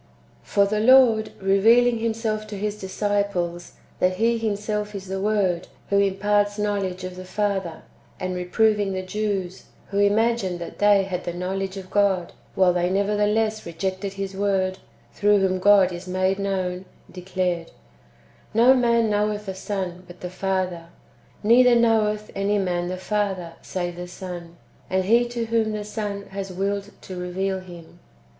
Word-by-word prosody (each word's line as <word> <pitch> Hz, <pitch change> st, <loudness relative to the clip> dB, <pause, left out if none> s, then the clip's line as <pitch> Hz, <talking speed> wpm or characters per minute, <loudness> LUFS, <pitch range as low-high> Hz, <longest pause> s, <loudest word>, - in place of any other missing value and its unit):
1. -, -, -32 dB, 0.3 s
For 200 Hz, -1 st, +2 dB
the 210 Hz, +1 st, -1 dB
Lord, 230 Hz, -2 st, +5 dB
revealing 225 Hz, +5 st, +4 dB
Himself 220 Hz, -1 st, -2 dB
to 210 Hz, -1 st, -6 dB
His 210 Hz, +1 st, -3 dB
disciples, 190 Hz, -3 st, -2 dB, 0.3 s
that 185 Hz, 0 st, +2 dB
He 230 Hz, +3 st, +2 dB
Himself 210 Hz, -1 st, -2 dB
is 195 Hz, -1 st, -6 dB
the 190 Hz, 0 st, -4 dB
Word, 195 Hz, -4 st, +1 dB, 0.2 s
who 200 Hz, -, +4 dB
imparts 205 Hz, +1 st, +1 dB
knowledge 200 Hz, -3 st, -2 dB
of 185 Hz, 0 st, -6 dB
the 185 Hz, -, -8 dB
Father, 195 Hz, -3 st, -2 dB, 0.4 s
and 185 Hz, 0 st, -2 dB
reproving 200 Hz, +3 st, +1 dB
the 185 Hz, 0 st, -3 dB
Jews, 195 Hz, -2 st, -3 dB, 0.2 s
who 200 Hz, -, -1 dB
imagined 205 Hz, -2 st, +2 dB
that 170 Hz, -, -8 dB
they 205 Hz, -1 st, +5 dB
had 185 Hz, -2 st, -4 dB
[the 175 Hz, -, -4 dB
knowledge 190 Hz, +2 st, -3 dB
of] 185 Hz, -1 st, -9 dB
God, 195 Hz, -3 st, +1 dB, 0.2 s
while 185 Hz, -2 st, +4 dB
they 175 Hz, 0 st, +1 dB
nevertheless 210 Hz, +2 st, +1 dB
rejected 190 Hz, +3 st, -4 dB
His 195 Hz, 0 st, -5 dB
Word, 190 Hz, -1 st, 0 dB, 0.3 s
through 205 Hz, 0 st, +3 dB
whom 190 Hz, -1 st, +1 dB
God 195 Hz, -1 st, +5 dB
is 175 Hz, +2 st, -8 dB
made 185 Hz, +1 st, 0 dB
known, 185 Hz, -2 st, -2 dB, 0.3 s
declared, 180 Hz, -2 st, -2 dB, 0.9 s
"No 240 Hz, +3 st, +7 dB
man 235 Hz, -3 st, +3 dB
knoweth 210 Hz, 0 st, 0 dB
the 190 Hz, -, -4 dB
Son, 185 Hz, -2 st, -4 dB
but 175 Hz, 0 st, -13 dB
the 180 Hz, -, -5 dB
Father; 185 Hz, -3 st, -2 dB, 0.6 s
neither 240 Hz, +3 st, +6 dB
knoweth 215 Hz, -2 st, +2 dB
any 200 Hz, +1 st, 0 dB
man 175 Hz, -3 st, -1 dB
the 185 Hz, +1 st, -3 dB
Father, 190 Hz, -3 st, -2 dB
save 175 Hz, -2 st, -4 dB
the 180 Hz, 0 st, -6 dB
Son, 175 Hz, -2 st, -8 dB, 0.3 s
and 190 Hz, 0 st, +1 dB
he 235 Hz, +4 st, +4 dB
to 240 Hz, -1 st, -3 dB
whom 225 Hz, -1 st, 0 dB
the 210 Hz, -1 st, -4 dB
Son 205 Hz, -1 st, -4 dB
has 195 Hz, -1 st, -5 dB
willed 200 Hz, +2 st, -2 dB
to 185 Hz, -, -8 dB
reveal 190 Hz, +2 st, -2 dB
[Him]." 175 Hz, -2 st, -13 dB
195 Hz, 160 wpm, -24 LUFS, 185-210 Hz, 0.9 s, No